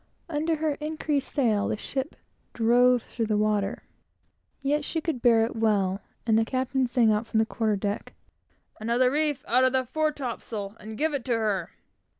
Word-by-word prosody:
Under 320 Hz, 0 st, 0 dB
her 310 Hz, -1 st, 0 dB
increased 305 Hz, -2 st, -2 dB
sail, 225 Hz, -8 st, +2 dB
the -, -, -1 dB
ship 265 Hz, +4 st, -4 dB, 0.4 s
drove 245 Hz, +1 st, +4 dB
on -, -, -24 dB
through 230 Hz, -2 st, -2 dB
the 210 Hz, -1 st, +1 dB
water. 210 Hz, -1 st, 0 dB, 0.8 s
Yet 290 Hz, +2 st, 0 dB
she 325 Hz, -, -2 dB
could 310 Hz, -6 st, -3 dB
bear 230 Hz, -2 st, +5 dB
it 230 Hz, -, -6 dB
well; 205 Hz, -4 st, +1 dB, 0.2 s
and 225 Hz, -1 st, +4 dB
the -, -, +3 dB
captain 260 Hz, +2 st, 0 dB
sang 235 Hz, -2 st, +3 dB
out 215 Hz, +2 st, 0 dB
from 220 Hz, -, -1 dB
the 220 Hz, -, +4 dB
quarter 220 Hz, -1 st, 0 dB
deck 200 Hz, +1 st, -4 dB, 0.6 s
"Another 240 Hz, +3 st, +2 dB
reef 295 Hz, -1 st, 0 dB
out 250 Hz, +2 st, +4 dB
of 260 Hz, 0 st, +3 dB
that 260 Hz, -2 st, 0 dB
fore 310 Hz, +2 st, +1 dB
topsail, 225 Hz, -7 st, -5 dB
and 215 Hz, 0 st, -8 dB
give 310 Hz, +3 st, +1 dB
it 275 Hz, -4 st, -2 dB
to 250 Hz, -, +1 dB
her!" 205 Hz, -6 st, -1 dB
240 Hz, 185 wpm, -27 LUFS, 220-280 Hz, 0.8 s, bear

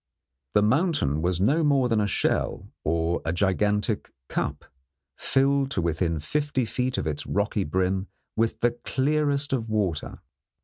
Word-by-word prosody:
The 105 Hz, -, +5 dB
mountain 130 Hz, -, +2 dB
was 90 Hz, +1 st, 0 dB
no 140 Hz, -, +3 dB
more 140 Hz, -4 st, +3 dB
than 115 Hz, -3 st, +2 dB
a 105 Hz, -, +1 dB
shell -, -, -1 dB
or 85 Hz, +2 st, 0 dB
a 80 Hz, -, -1 dB
gigantic 105 Hz, +4 st, 0 dB, 0.2 s
cup, -, -, -2 dB, 0.5 s
filled 135 Hz, 0 st, +2 dB
to 95 Hz, -, -1 dB
within 85 Hz, 0 st, 0 dB
fifty 145 Hz, -, -1 dB
feet 125 Hz, +2 st, -1 dB
of -, -, -1 dB
its 75 Hz, -2 st, -3 dB
rocky -, -, 0 dB
brim 95 Hz, +4 st, 0 dB, 0.3 s
with 115 Hz, 0 st, 0 dB
the 120 Hz, -, +4 dB
clearest 145 Hz, 0 st, +1 dB
of 115 Hz, -4 st, -1 dB
water. 100 Hz, -8 st, -1 dB
110 Hz, 145 wpm, -26 LUFS, 90-135 Hz, 0.5 s, The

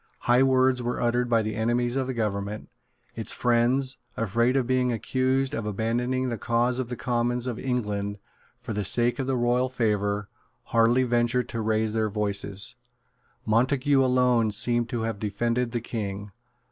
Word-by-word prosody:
High 120 Hz, +1 st, +3 dB
words 130 Hz, -1 st, +3 dB
were 120 Hz, 0 st, -2 dB
uttered 120 Hz, +1 st, +1 dB
by 115 Hz, -2 st, +3 dB
the 110 Hz, 0 st, -3 dB
enemies 120 Hz, +3 st, 0 dB
of 135 Hz, -1 st, -1 dB
the 130 Hz, -, -3 dB
government. 105 Hz, -2 st, -3 dB, 0.4 s
Its -, -, -3 dB
friends, 125 Hz, +2 st, +1 dB, 0.2 s
afraid 115 Hz, +4 st, +1 dB
of 130 Hz, -, +1 dB
being 125 Hz, 0 st, +1 dB
accused 130 Hz, +3 st, 0 dB
of 110 Hz, -2 st, -3 dB
abandoning 120 Hz, +5 st, -1 dB
the 115 Hz, -3 st, -4 dB
cause 120 Hz, +3 st, 0 dB
of 125 Hz, -2 st, -3 dB
the 125 Hz, -, -3 dB
Commons 120 Hz, +1 st, -1 dB
of 120 Hz, -2 st, -4 dB
England 105 Hz, -6 st, -2 dB, 0.4 s
for 120 Hz, -1 st, -6 dB
the 105 Hz, 0 st, -2 dB
sake 120 Hz, -, +3 dB
of 130 Hz, -, -2 dB
royal 125 Hz, 0 st, +1 dB
favour, 105 Hz, -4 st, -1 dB, 0.4 s
hardly 115 Hz, +2 st, +3 dB
ventured 120 Hz, 0 st, +1 dB
to 115 Hz, -2 st, -3 dB
raise 110 Hz, 0 st, 0 dB
their 110 Hz, -1 st, 0 dB
voices. 100 Hz, -1 st, -2 dB, 0.7 s
Montague 130 Hz, +5 st, +2 dB
alone 125 Hz, -3 st, +3 dB
seems 120 Hz, +3 st, +2 dB
to 115 Hz, -1 st, -3 dB
have 110 Hz, -3 st, -3 dB
defended 115 Hz, +4 st, -1 dB
the 120 Hz, -1 st, -2 dB
King. 105 Hz, -3 st, -5 dB
120 Hz, 160 wpm, -26 LUFS, 110-125 Hz, 0.7 s, High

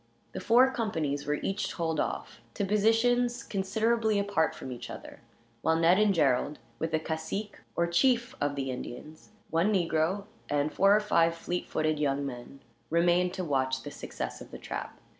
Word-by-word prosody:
The -, -, -5 dB
four 240 Hz, +7 st, +5 dB
companies 155 Hz, -, -2 dB
were 150 Hz, -, +2 dB
each 195 Hz, +1 st, -1 dB
told 160 Hz, -3 st, -2 dB
off, 115 Hz, -, -3 dB
to 200 Hz, -, 0 dB
positions 235 Hz, +4 st, +2 dB
considerably 220 Hz, +3 st, +1 dB
apart 200 Hz, -5 st, +1 dB
from 130 Hz, -, -7 dB
each 120 Hz, -1 st, -7 dB
other; -, -, -9 dB, 0.4 s
while 160 Hz, -, +2 dB
Ned 165 Hz, +4 st, +4 dB
and 210 Hz, -1 st, +4 dB
Gerald, 145 Hz, -4 st, +2 dB, 0.2 s
with 160 Hz, -, -1 dB
the 160 Hz, -, +1 dB
cacique, 160 Hz, +7 st, -4 dB, 0.2 s
or 170 Hz, -, +2 dB
chief, 240 Hz, +8 st, +2 dB
of 145 Hz, 0 st, 0 dB
the 135 Hz, -1 st, -2 dB
Indians, 140 Hz, -, -8 dB, 0.2 s
one 165 Hz, +6 st, +2 dB
negro, 175 Hz, 0 st, +1 dB, 0.3 s
and 145 Hz, +1 st, 0 dB
four 195 Hz, +1 st, +5 dB
or -, -, +4 dB
five 170 Hz, -5 st, +3 dB
fleet 175 Hz, +1 st, -4 dB
footed 155 Hz, -1 st, 0 dB
young 140 Hz, -1 st, 0 dB
men, 130 Hz, +1 st, -8 dB, 0.3 s
remained 175 Hz, +2 st, +2 dB
to 185 Hz, -, -3 dB
watch 130 Hz, -3 st, 0 dB
the -, -, -7 dB
success 60 Hz, 0 st, -6 dB
of -, -, -10 dB
the -, -, -8 dB
trap. -, -, -6 dB
170 Hz, 175 wpm, -29 LUFS, 145-205 Hz, 0.4 s, four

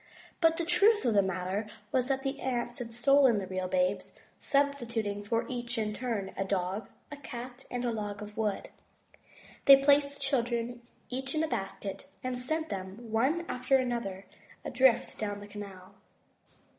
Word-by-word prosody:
But 330 Hz, -1 st, +4 dB
the 340 Hz, -, -1 dB
truth 400 Hz, -, +4 dB
of 235 Hz, -, +3 dB
the 200 Hz, -, +6 dB
matter 190 Hz, +2 st, -2 dB, 0.2 s
was 255 Hz, -1 st, +2 dB
that 270 Hz, -1 st, 0 dB
the 275 Hz, +1 st, -2 dB
aunts 240 Hz, -2 st, -2 dB
had 235 Hz, -2 st, -5 dB
stolen 255 Hz, 0 st, +5 dB
the 195 Hz, -, -2 dB
real 185 Hz, 0 st, -3 dB
babes, 185 Hz, +2 st, 0 dB, 0.3 s
substituting 235 Hz, -8 st, 0 dB
for 230 Hz, +3 st, 0 dB
each 240 Hz, -1 st, -3 dB
in 215 Hz, -1 st, 0 dB
turn 210 Hz, -5 st, -3 dB
a 195 Hz, -, -1 dB
dog, 190 Hz, +2 st, -2 dB, 0.2 s
a 290 Hz, -, -6 dB
cat, 250 Hz, -1 st, -8 dB
and 245 Hz, 0 st, -2 dB
a 240 Hz, -, +1 dB
log 205 Hz, -2 st, -4 dB
of 210 Hz, 0 st, -10 dB
wood. 215 Hz, -3 st, -1 dB, 1.0 s
They 275 Hz, -1 st, +9 dB
placed 285 Hz, 0 st, +4 dB
the -, -, -17 dB
children 240 Hz, -3 st, 0 dB, 0.3 s
each 265 Hz, +3 st, -3 dB
in 310 Hz, -, +2 dB
a -, -, +1 dB
basket, 195 Hz, -5 st, -4 dB, 0.2 s
and 255 Hz, -1 st, -2 dB
sent 315 Hz, +5 st, -2 dB
them, 195 Hz, +4 st, -6 dB
one 275 Hz, +10 st, +2 dB
after 260 Hz, +2 st, +2 dB
the 245 Hz, -1 st, 0 dB
other, 195 Hz, -4 st, -5 dB, 0.4 s
adrift 255 Hz, -1 st, +3 dB
down 205 Hz, -1 st, -2 dB
the 205 Hz, -, -9 dB
canal. 200 Hz, -3 st, -9 dB
240 Hz, 170 wpm, -30 LUFS, 205-270 Hz, 1.0 s, They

